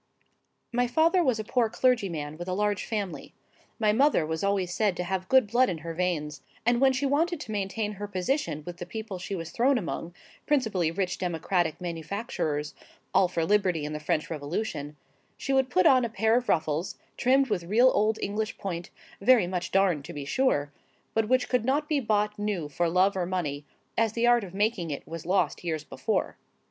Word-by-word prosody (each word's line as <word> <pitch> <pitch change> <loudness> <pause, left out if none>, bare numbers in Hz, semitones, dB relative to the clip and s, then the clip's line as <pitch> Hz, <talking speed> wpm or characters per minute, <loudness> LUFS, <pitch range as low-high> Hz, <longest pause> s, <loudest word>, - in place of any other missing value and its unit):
My 245 +1 +2
father 330 +8 +3
was 255 -7 +2
a - - -2
poor 230 +1 +1
clergyman 195 - 0
with 175 +3 -7
a 185 - -1
large 205 -1 0
family. 205 -5 -4 0.4
My 215 -2 +2
mother 270 - +3
was 160 +2 -3
always 195 -3 0
said 205 -3 +1
to 180 - -1
have 185 +1 -3
good 260 -3 +6
blood 240 +5 +3
in 175 - -2
her 165 - -4
veins; 160 -4 -2 0.2
and 240 +1 +3
when 270 -1 +6
she 260 +2 -1
wanted 320 +5 +1
to 220 - -7
maintain 205 +1 -2
her 205 0 -6
position 185 - -1
with 175 -1 -7
the 175 -1 -7
people 220 -1 -6
she 185 +2 -4
was 165 -2 -6
thrown 260 +3 +3
among,—principally 190 - -2
rich 180 +1 -2
democratic 175 -1 0
manufacturers, 165 -3 -3 0.4
all 190 - +5
for 170 -2 -1
liberty 185 -6 +2
and 150 - -4
the 150 - -4
French 155 0 -1
Revolution,—she 150 - -5
would 265 -1 +3
put 185 -7 +3
on 255 -2 +6
a 235 - -1
pair 220 0 +2
of 245 0 0
ruffles, 155 +2 0 0.2
trimmed 265 0 +3
with 175 -5 -1
real 235 +8 +5
old 215 +1 +2
English 215 +2 -2
point, 175 -3 -5 0.3
very 240 -2 +5
much 180 -1 -3
darned 185 -7 +2
to - - -8
be 145 -1 -6
sure,—but 210 - -1
which 255 0 +3
could 250 -3 +1
not 285 +5 +1
be 300 -2 +1
bought 210 -3 0
new 205 -7 -2
for 170 +4 0
love 185 +3 +3
or 180 -2 -1
money, 150 -6 -3 0.3
as 225 -1 +1
the 235 +1 +1
art 240 -1 +4
of 190 -1 -9
making 205 -4 0
it 140 - -5
was 165 0 -7
lost 190 0 +1
years 160 -3 -2
before. - - -2
195 Hz, 195 wpm, -27 LUFS, 170-235 Hz, 0.4 s, good